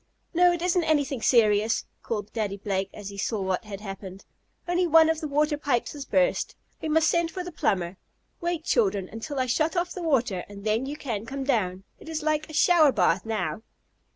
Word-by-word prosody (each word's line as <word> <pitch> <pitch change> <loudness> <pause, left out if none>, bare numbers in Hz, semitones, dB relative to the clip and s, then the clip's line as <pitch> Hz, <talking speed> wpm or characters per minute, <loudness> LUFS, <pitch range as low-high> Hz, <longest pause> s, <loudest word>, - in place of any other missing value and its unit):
"No, 355 +1 +5
it 345 -1 -2
isn't 360 -1 +2
anything 285 -5 +1
serious!" 215 -2 +3 0.2
called 210 -2 -4
Daddy 210 -3 -2
Blake 195 -1 -2
when 205 - -10
he 200 0 -7
saw 220 +1 -1
what 190 +2 -1
had 205 -1 -7
happened. 195 -1 -8 0.4
"Only 350 +1 +2
one 325 0 +6
of 320 0 -3
the 310 - -2
water 300 +1 +1
pipes 260 -5 0
has 285 -2 -7
burst. 275 -1 +1 0.3
We 315 - -3
must 320 +1 +3
send 340 -1 +2
for 365 +2 -5
the 360 - -7
plumber. 185 - -1 0.4
Wait, 345 -2 -2
children, 200 - +1
until 225 +7 -6
I 255 - +2
shut 310 +7 +1
off 350 0 -1
the 365 - -6
water, 245 - +1
and 200 -1 -10
then 220 +5 0
you 290 +2 -5
can 225 -6 -4
come 275 +2 -4
down. 195 -9 0 0.2
It - - -11
is 315 -1 -3
like 310 0 0
a - - -9
shower 315 -2 +5
bath 190 -4 +1
now." 185 -5 -2
260 Hz, 210 wpm, -26 LUFS, 205-315 Hz, 0.4 s, one